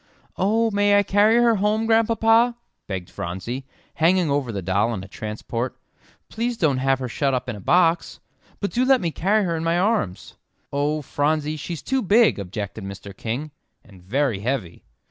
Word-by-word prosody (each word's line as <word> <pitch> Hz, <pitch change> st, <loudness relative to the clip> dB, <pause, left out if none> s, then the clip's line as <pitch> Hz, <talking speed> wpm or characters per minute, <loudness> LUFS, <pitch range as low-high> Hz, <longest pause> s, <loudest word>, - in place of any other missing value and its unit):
"Oh, 225 Hz, +4 st, +1 dB
may 205 Hz, 0 st, +3 dB
I 205 Hz, -, +4 dB
carry 205 Hz, +3 st, +4 dB
her 235 Hz, -2 st, +4 dB
home, 210 Hz, +3 st, +1 dB
Grandpapa?" 225 Hz, +1 st, +3 dB, 0.3 s
begged 95 Hz, -3 st, -4 dB
Phronsie, 115 Hz, +10 st, -5 dB, 0.3 s
hanging 170 Hz, -1 st, +2 dB
over 140 Hz, -4 st, 0 dB
the 100 Hz, -3 st, -4 dB
doll 100 Hz, +6 st, +1 dB
in 95 Hz, -, -6 dB
a -, -, -10 dB
transport. 110 Hz, +4 st, -5 dB, 0.5 s
"Please 235 Hz, +1 st, -3 dB
don't 145 Hz, -, +1 dB
have 135 Hz, 0 st, +2 dB
her 130 Hz, -1 st, -4 dB
shut 135 Hz, +2 st, 0 dB
up 125 Hz, -, -3 dB
in 120 Hz, -, -3 dB
a -, -, -9 dB
box 170 Hz, -, +2 dB, 0.4 s
but 200 Hz, -, -2 dB
do 245 Hz, -, +1 dB
let 265 Hz, 0 st, +4 dB
me 170 Hz, -3 st, -2 dB
carry 205 Hz, +7 st, +1 dB
her 170 Hz, -3 st, -1 dB
in 160 Hz, -, -3 dB
my 165 Hz, +1 st, +1 dB
arms." 190 Hz, -, -1 dB, 0.4 s
"Oh, 145 Hz, +2 st, 0 dB
Phronsie, 150 Hz, +2 st, 0 dB
she's 155 Hz, +1 st, -6 dB
too 265 Hz, 0 st, 0 dB
big," 210 Hz, -, +4 dB
objected 100 Hz, +1 st, -5 dB
Mr. 100 Hz, 0 st, -8 dB
King, 130 Hz, +7 st, -4 dB, 0.3 s
"and 95 Hz, -4 st, -17 dB
very 120 Hz, +3 st, 0 dB
heavy." 105 Hz, -6 st, -3 dB
155 Hz, 180 wpm, -23 LUFS, -, 0.5 s, I